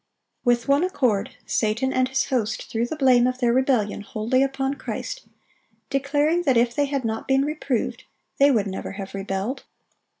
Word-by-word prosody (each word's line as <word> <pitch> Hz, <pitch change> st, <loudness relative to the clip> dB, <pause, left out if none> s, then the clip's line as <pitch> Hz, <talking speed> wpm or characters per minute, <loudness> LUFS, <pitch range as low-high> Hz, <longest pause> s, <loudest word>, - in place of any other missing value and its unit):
With 240 Hz, -1 st, +2 dB
one 280 Hz, +3 st, +4 dB
accord, 250 Hz, -, 0 dB
Satan 225 Hz, +4 st, 0 dB
and 255 Hz, 0 st, +2 dB
his 265 Hz, 0 st, 0 dB
host 230 Hz, -5 st, -1 dB
threw 230 Hz, +1 st, 0 dB
the 315 Hz, -, -4 dB
blame 255 Hz, -4 st, +4 dB
of 255 Hz, 0 st, -1 dB
their 240 Hz, -2 st, +2 dB
rebellion 250 Hz, -6 st, +1 dB
wholly 220 Hz, +5 st, 0 dB
upon 270 Hz, 0 st, 0 dB
Christ, -, -, -6 dB, 0.6 s
declaring 290 Hz, +5 st, +1 dB
that 265 Hz, -8 st, +2 dB
if 235 Hz, 0 st, +3 dB
they 290 Hz, +3 st, +1 dB
had 275 Hz, -3 st, -2 dB
not 220 Hz, 0 st, -3 dB
been 270 Hz, +1 st, +3 dB
reproved, 290 Hz, -5 st, -2 dB, 0.3 s
they 280 Hz, +1 st, +7 dB
would 225 Hz, -7 st, +2 dB
never 190 Hz, -1 st, -5 dB
have 195 Hz, -1 st, -7 dB
rebelled. 195 Hz, +5 st, -3 dB
255 Hz, 170 wpm, -24 LUFS, 225-275 Hz, 0.6 s, they